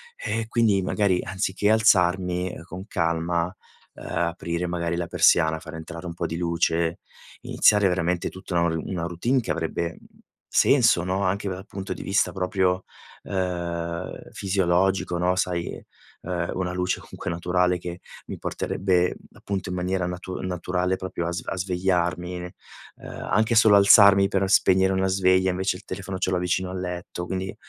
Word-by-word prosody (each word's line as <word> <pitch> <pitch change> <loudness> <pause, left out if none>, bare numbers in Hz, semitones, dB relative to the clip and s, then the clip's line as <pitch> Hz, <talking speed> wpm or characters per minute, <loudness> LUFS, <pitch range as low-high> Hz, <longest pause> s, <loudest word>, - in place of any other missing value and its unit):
e 115 - -3
quindi 110 -4 +2
magari 95 -1 +1
anziché 95 +1 -1
alzarmi, 90 -4 +3
ehm, - - -9
con 90 +2 -9
calma, 85 -2 0 0.5
uhm, - - -12
aprire, 85 +1 -2
magari 85 -1 -2
la 85 0 -3
persiana, 80 0 +3
far 80 0 -10
entrare 80 +1 -8
un 85 - -5
po' 85 0 -3
di 80 0 -3
luce, 85 -1 0 0.4
iniziare 105 -2 +4
veramente 90 -1 0
tutta 95 -1 -5
un 80 -1 0
una 90 -3 -3
routine 115 +10 0
che - - -3
avrebbe 85 0 -3 0.5
senso, 110 -10 +4
no, 95 +2 -1
anche 100 +2 -1
dal 95 +1 -6
punto 100 -1 -5
di - - -8
vista 95 0 +1
proprio, 95 -1 0 0.4
uhm, 85 -2 -3 0.2
fisiologico, 95 -1 +1
no? 90 +1 +1
Sai, 90 -2 -2 0.4
uhm, 90 -1 -3
una 90 -1 -2
luce 90 0 -1
comunque - - -7
naturale 90 +1 +1
che 90 0 -7 0.3
mi - - -6
porterebbe, 90 -2 0 0.2
appunto 95 -2 -4
in 90 - -3
maniera 90 0 -1
natu 90 +1 -6
naturale, 90 0 -1
proprio 95 -2 -4
a - - -2
sve 85 - -5
a - - -4
svegliarmi. 90 -1 -1 0.5
Uhm, - - -11 0.2
anche 110 +2 +2
solo 110 -2 +7
alzarmi 100 0 +7
per 95 0 0
spegnere 95 0 +4
una 95 0 +1
sveglia 95 0 +3
invece 95 0 -1
il 100 - -17
telefono 95 -1 -5
ce 95 0 -1
l'ho 90 - +1
vicino 90 +1 -1
al 95 0 -5
letto. 90 0 -5
Quindi, 95 +1 -4
90 Hz, 160 wpm, -24 LUFS, 85-95 Hz, 0.5 s, solo